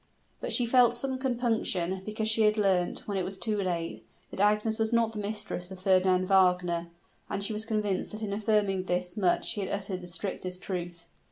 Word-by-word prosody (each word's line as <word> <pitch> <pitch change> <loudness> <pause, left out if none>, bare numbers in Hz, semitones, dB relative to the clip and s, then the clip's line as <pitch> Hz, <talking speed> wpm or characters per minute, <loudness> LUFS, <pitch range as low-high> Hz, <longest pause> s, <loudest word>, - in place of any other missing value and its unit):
But - - -4
she 245 - +2
felt 245 0 +5
some 260 +1 -3
compunction, 225 -8 0
because 215 +1 -3
she 220 +1 +3
had 215 0 +4
learnt, 190 -4 +1
when 200 -2 -1
it - - 0
was 190 +2 -5
too 210 0 -1
late, 170 -3 -3 0.3
that - - -7
Agnes 210 +2 +2
was 220 0 +1
not 230 -1 +2
the 215 - -5
mistress 205 -3 -4
of 190 -1 -9
Fernand 185 -1 +3
Wagner; 180 -3 +3 0.4
and 200 - -2
she 210 - -2
was 215 +1 -3
convinced 210 -4 -1
that 215 +1 -6
in 200 -2 -2
affirming 205 -3 +1
this 180 0 -1
much 185 -4 +1
he 205 - -3
had 190 - -3
uttered 195 -2 -3
the 180 - -9
strictest 185 0 -4
truth. 175 -2 -5
200 Hz, 200 wpm, -29 LUFS, 185-220 Hz, 0.4 s, felt